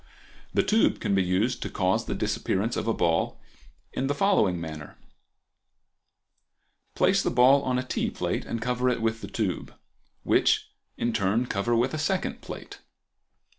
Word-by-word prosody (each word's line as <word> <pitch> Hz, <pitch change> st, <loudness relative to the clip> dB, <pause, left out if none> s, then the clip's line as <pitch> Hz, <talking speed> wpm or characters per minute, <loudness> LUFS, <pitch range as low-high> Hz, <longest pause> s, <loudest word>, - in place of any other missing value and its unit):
The -, -, +2 dB
tube 220 Hz, +1 st, +2 dB
can 105 Hz, -3 st, -1 dB
be 95 Hz, -, +3 dB
used 95 Hz, +7 st, 0 dB
to -, -, -3 dB
cause 95 Hz, -1 st, 0 dB
the -, -, -3 dB
disappearance 110 Hz, +5 st, -1 dB
of 110 Hz, -, -3 dB
a 115 Hz, -, +2 dB
ball 85 Hz, -1 st, 0 dB, 0.5 s
in 135 Hz, -, -1 dB
the 145 Hz, -, 0 dB
following 140 Hz, -, +2 dB
manner:—Place 80 Hz, -3 st, -6 dB
the -, -, 0 dB
ball 130 Hz, +3 st, +5 dB
on 130 Hz, -2 st, 0 dB
a 125 Hz, -, -1 dB
tea -, -, -1 dB
plate -, -, -2 dB
and 115 Hz, -, -3 dB
cover 125 Hz, +1 st, +1 dB
it 125 Hz, -, 0 dB
with 115 Hz, 0 st, 0 dB
the -, -, -6 dB
tube, 95 Hz, -8 st, -3 dB, 0.5 s
which -, -, +2 dB, 0.3 s
in 120 Hz, -, -1 dB
turn 105 Hz, +4 st, +1 dB
cover 115 Hz, +1 st, 0 dB
with 125 Hz, +4 st, +1 dB
a 155 Hz, -, -2 dB
second 185 Hz, +4 st, -1 dB
plate. -, -, -9 dB
115 Hz, 160 wpm, -27 LUFS, 95-125 Hz, 0.5 s, ball